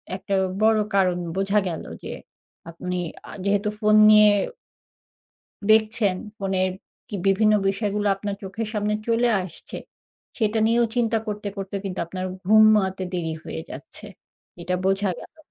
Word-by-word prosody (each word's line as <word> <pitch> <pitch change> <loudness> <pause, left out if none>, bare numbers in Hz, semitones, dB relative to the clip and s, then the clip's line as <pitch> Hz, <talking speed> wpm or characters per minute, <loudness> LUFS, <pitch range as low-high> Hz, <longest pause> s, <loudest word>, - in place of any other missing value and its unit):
একটা 195 +1 -3 0.3
বড় 220 0 +4 0.2
কারণ 185 -2 +3 0.2
বোঝা 195 +2 +2
গেল 165 -3 -4 0.2
যে - - -6 0.6
আপনি 180 +2 -5 0.3
আ - - -8
যেহেতু 205 +1 +1
ফোন 215 -1 +3
নিয়ে 210 0 +8 1.4
দেখছেন, 215 -3 +3 0.2
ফোনের 190 -1 0 0.4
কি 205 - -4
বিভিন্ন 215 +2 +4 0.2
বিষয়গুলো 205 +1 -1
আপনার 200 0 -4
চোখের 215 +4 -4
সামনে 210 0 0
চলে 235 +1 +2
আসছে, 175 -3 -9 0.6
সেটা 220 -1 +1
নিয়েও 235 +1 +3
চিন্তা 230 -2 +2
করতে, 210 0 -4
করতে 195 0 -5
কিন্তু 185 -2 -4
আপনার 185 +2 -5 0.2
ঘুমাতে 210 -2 +4
দেরি 165 -3 -2
হয়ে 80 - -6
যাচ্ছে। - - -10 0.6
এটা 180 +1 -1
বোঝা 195 +1 +1
গেলো। 320 - -14
205 Hz, 135 wpm, -23 LUFS, 190-215 Hz, 1.4 s, নিয়ে